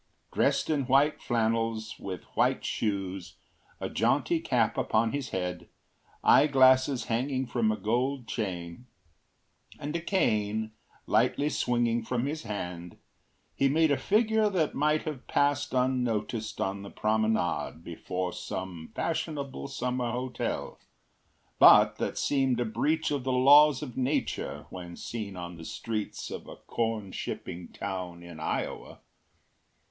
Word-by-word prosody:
Dressed - - +2
in 145 -5 0
white 140 +3 +3
flannels, 115 -2 -1
with 95 -3 -6
white - - +2
shoes, 95 -3 -3 0.4
a - - -3
jaunty - - +1
cap - - +1
upon 110 +1 +1
his 140 -2 -3
head, 90 -1 -4 0.5
eyeglasses 130 -2 +5
hanging 130 +3 -1
from 120 -3 +1
a 110 - -2
gold 125 +5 -1
chain, 90 0 -4 0.9
and 150 +2 -4
a 170 - -1
cane 110 - 0 0.3
lightly 125 +6 +2
swinging 120 -3 +1
from 120 +2 -2
his 155 +2 -3
hand, 90 - -6 0.6
he 135 - +2
made 160 +2 +3
a - - +4
figure 215 - +2
that 175 -6 0
might 150 +2 +1
have 150 -5 -6
passed 145 0 +1
unnoticed 125 -4 -1
on 95 +1 -2
the 100 - -8
promenade 110 -6 0
before 90 +2 -4
some 90 -4 -6
fashionable 145 -5 -3
summer 125 -2 -2
hotel, 125 +1 -3 0.8
but - - +8
that - - -3
seemed 135 -3 +1
a 120 - +1
breach 155 +8 0
of 140 -3 -1
the 130 - -1
laws 140 +2 +6
of 125 -5 -7
nature 130 +3 -2
when 90 -2 -8
seen 105 -4 -6
on 85 -1 -7
the 80 - -9
streets 110 +5 -4
of - - -7
a - - -9
corn 110 -4 -3
shipping 85 -1 -5
town 90 -3 -6
in 85 -2 -10
Iowa. 80 - -4
120 Hz, 130 wpm, -29 LUFS, 100-140 Hz, 0.9 s, but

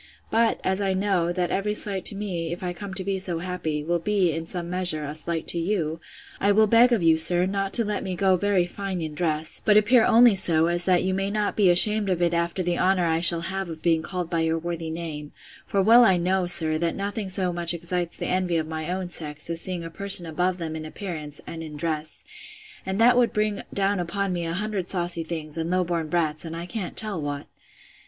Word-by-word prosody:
But, 225 0 +2
as 190 +1 -1
I 195 -1 0
know, 185 -3 0
that 175 0 -2
every 210 +2 -1
slight 195 -3 -1
to - - +6
me, 180 -5 -4
if 175 +2 -6
I 180 -1 -3
come 190 +2 -8
to 190 - -2
be 195 0 -2
so 180 -3 -1
happy, 165 -4 -4
will 170 +2 -1
be, 195 -1 +1
in 165 +1 -5
some 175 -1 -5
measure, 175 -4 +1
a 145 - -5
slight 160 +1 -4
to 170 - 0
you, 165 -3 -2 0.4
I 200 - +2
will 215 +2 +4
beg 230 +3 +5
of 225 -7 +1
you, 165 -1 +4
sir, 175 +2 +3
not 195 0 -2
to 230 - +5
let 210 0 -2
me 185 -1 -4
go 190 +1 +2
very 195 -1 +1
fine 190 +1 -5
in 160 -2 -5
dress; 155 -1 -1
but 210 -1 +4
appear 225 +3 +5
only 235 0 +6
so, 165 -4 +2
as 175 +1 -1
that 180 -2 +2
you 185 0 -1
may 195 +1 -1
not 210 0 -1
be 200 -4 +3
ashamed 205 +3 +6
of 180 -2 0
it 175 -1 +1
after 170 +2 -1
the 175 0 -1
honour 185 -1 +2
I 165 -1 +1
shall 170 0 +4
have 190 +1 -4
of 160 -1 -9
being 165 -2 +2
called 180 +1 -4
by 170 0 -2
your 160 0 0
worthy 165 -1 -5
name: 160 -3 -7 0.3
for 195 -1 +1
well 230 +4 +7
I 190 -6 +4
know, 180 +1 0
sir, 160 -3 +1
that 170 0 -1
nothing 200 0 -4
so 185 -1 -1
much 170 -1 +2
excites 170 0 -3
the - - -4
envy 180 -2 0
of 160 - -1
my 160 +1 -5
own 185 0 -3
sex, 155 -2 -5
as 165 0 0
seeing 180 -2 -3
a 165 - -8
person 195 0 +6
above 180 +3 -1
them 160 -2 -5
in 160 - -6
appearance, 155 -3 -6
and 165 - -8
in 155 -2 -8
dress. 155 0 -3 0.6
And 190 +2 -2
that 245 +2 +5
would 240 - +1
bring 210 -1 -1
down 200 0 0
upon 185 +2 -2
me 170 -1 -3
an 165 - -3
hundred 200 -1 -3
saucy 175 -2 0
things, 160 -1 -6
and 165 +1 -3
low 185 0 +1
born 170 -2 -3
brats, 155 -2 -1
and 165 -1 -7
I 170 +1 -6
can't 190 -1 -6
tell 210 -7 -1
what! 145 -1 -5
175 Hz, 240 wpm, -24 LUFS, 165-195 Hz, 0.6 s, well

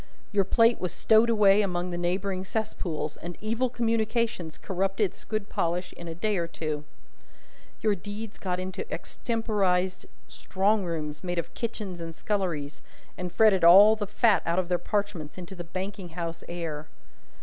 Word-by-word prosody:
Your 200 -2 +3
plate 230 +4 +4
was 180 - -1
stowed 220 +1 +4
away 210 -2 +5
among 180 -2 -1
the - - -3
neighbouring 185 +2 -1
cesspools, 185 -7 -3
and 175 0 -7
evil 230 +4 0
communications 230 -6 -1
corrupted 195 +1 0
its - - -14
good 215 -2 -3
polish 175 0 -1
in 170 - -9
a 165 - -5
day 210 +3 0
or 170 -1 -1
two. 155 -2 -4 1.0
Your 215 -2 +3
deeds 205 +3 -7
got 180 -1 -2
into 185 - -5
extemporised 195 -6 -1 0.2
strong 200 +2 0
rooms 155 -2 -4
made 175 -1 -3
of 170 - -3
kitchens 210 -6 -4
and 165 -1 -6
sculleries, 170 -9 -2 0.3
and 180 -1 -5
fretted 210 -3 +4
all 200 +6 +9
the 210 -2 -4
fat 210 +1 +3
out 170 +1 0
of 185 -1 0
their 180 -1 +2
parchments 200 -8 -2
into 180 +1 -8
the 175 -2 -6
banking 185 +1 -5
house 165 0 -5
air. 160 -3 -4
190 Hz, 160 wpm, -27 LUFS, 175-215 Hz, 1.0 s, all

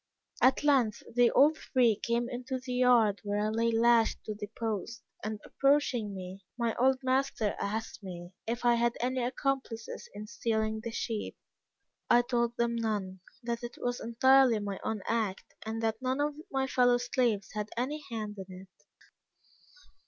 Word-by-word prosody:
At 260 +3 +4
length 265 -7 +2
they 245 -1 +5
all 295 +3 +5
three 250 -7 +2
came 235 +3 -1
into 255 +1 -4
the 255 0 -6
yard 245 -5 +4
where 205 0 -1
I 210 +1 +1
lay 230 +1 +1
lashed 230 0 +3
to 215 - -4
the 205 0 -6
post, 225 0 -3 0.2
and 215 0 -3
approaching 265 -7 +1
me, 185 +1 -8
my 235 -2 0
old 260 +1 +4
master 260 -5 0
asked 220 +3 -3
me 175 -2 -8 0.2
if 240 +2 -3
I 240 - +6
had 235 0 +1
any 255 +2 0
accomplices 255 -2 -3
in 210 +1 -6
stealing 220 -1 -1
the 230 - -3
sheep. 225 -2 -4 0.7
I 240 - +6
told 240 -1 0
them 235 0 +1
none 205 -5 -2 0.2
that 235 0 -3
it 240 0 -7
was 245 0 -2
entirely 260 +1 +4
my 200 -2 -4
own 220 -3 -3
act 220 -4 -2
and 225 +1 -3
that 225 +1 -1
none 260 +1 -1
of 295 +1 +1 0.2
my 265 0 +1
fellow 245 -2 +3
slaves 240 -5 0
had 210 0 -3
any 290 +5 -2
hand 215 -3 -5
in 185 -1 -9 0.2
it. - - -31
235 Hz, 165 wpm, -30 LUFS, 215-250 Hz, 0.7 s, I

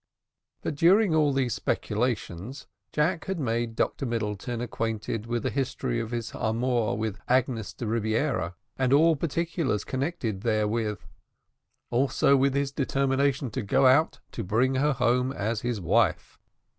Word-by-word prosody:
But, - - -2
during 180 +5 +4
all 155 -2 +3
these 135 -3 0
speculations, 115 - -2 0.3
Jack 160 +3 0
had 190 -2 -3
made 115 -3 -1
Dr 135 - -1
Middleton 115 +1 -3
acquainted 115 -1 -3
with 120 0 -2
the - - -1
history 130 -3 -2
of 115 -1 -4
his 115 -1 -4
amour 115 0 0
with 110 -1 -3
Agnes 125 -4 +1
de 120 - -6
Rebiera, 110 - 0 0.2
and 130 0 +2
all 160 +3 +5
particulars 165 - -1
connected 130 - -3
therewith, 110 -1 0 0.9
also 135 +2 +3
with 135 0 +2
his 140 -1 0
determination 135 -1 0
to 130 - -3
go 130 +6 +2
out 135 +5 +4
to - - -4
bring 120 +8 +2
her 140 +3 +2
home 125 +1 +1
as 110 -2 -2
his 120 -3 -2
wife. 90 -1 +1
125 Hz, 145 wpm, -27 LUFS, 110-140 Hz, 0.9 s, all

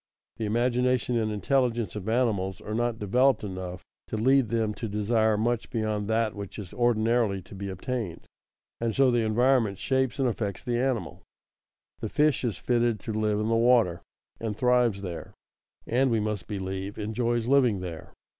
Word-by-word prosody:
_ - - -37
The 110 - -2
imagination 125 +2 +1
and 110 -2 0
intelligence 115 -2 0
of 105 0 -4
animals 105 -6 0
are 105 - -6
not 120 0 0
developed 120 +4 +2
enough 95 -2 -6 0.2
to - - -3
lead 130 +2 +4
them 110 -1 0
to 115 +1 -5
desire 110 +1 +2
much 115 +1 -1
beyond 110 -3 -1
that 110 0 +1
which 100 -2 -7
is 100 -5 -8
ordinarily 115 -3 +2
to 90 - -14
be 100 0 -5
obtained. 95 -1 -4 0.5
And 115 -1 -1
so 135 -2 +4
the 120 - +2
environment 115 -1 +2
shapes 130 +3 0
and 135 -2 +2
affects 105 -5 -3
the 120 -1 -1
animal. 130 -3 -1 0.8
The 110 - -4
fish 150 +2 +2
is 115 -7 -1
fitted 120 -3 +1
to 110 - -4
live 105 -1 0
in 105 - -1
the 115 - +2
water 115 -7 +3 0.4
and 110 -2 -3
thrives 125 -5 +2
there, 85 -3 -7 0.5
and 130 +3 +2
we 115 -2 +2
must 105 -1 -3
believe, 95 0 -4
enjoys 115 +2 -1
living 125 -6 +3
there. 85 -3 -7
110 Hz, 175 wpm, -27 LUFS, 105-120 Hz, 0.8 s, lead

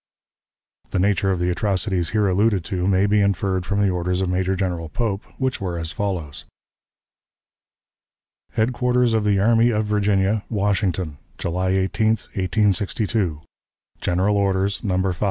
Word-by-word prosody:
The - - -2
nature 95 0 +2
of 95 - +1
the 90 +1 0
atrocities 95 -2 0
here 105 -2 +1
alluded 100 -1 +2
to 95 -3 -2
may 95 0 +3
be 105 +1 +3
inferred 95 -2 0
from 100 -1 0
the 100 -2 +3
orders 90 0 -1
of 95 -1 0
Major 95 +1 0
General 90 -4 -2
Pope, 105 0 -2
which 130 -4 -1
were 90 -3 -3
as 80 -1 -3
follows: 85 -5 -4 2.1
"HEADQUARTERS 125 +1 +1
OF 110 -1 +2
THE 105 -1 +2
ARMY 115 +3 +4
OF 110 -2 0
VIRGINIA, 105 0 +1
WASHINGTON, 95 -7 -1 0.2
July 90 +2 -1
18, 95 +3 +1 0.3
1862. 100 -2 0 0.6
"(GENERAL 95 +4 +1
ORDERS, 100 0 0
No 95 -4 0
5.) 95 -2 -1
95 Hz, 140 wpm, -22 LUFS, 90-105 Hz, 2.1 s, ARMY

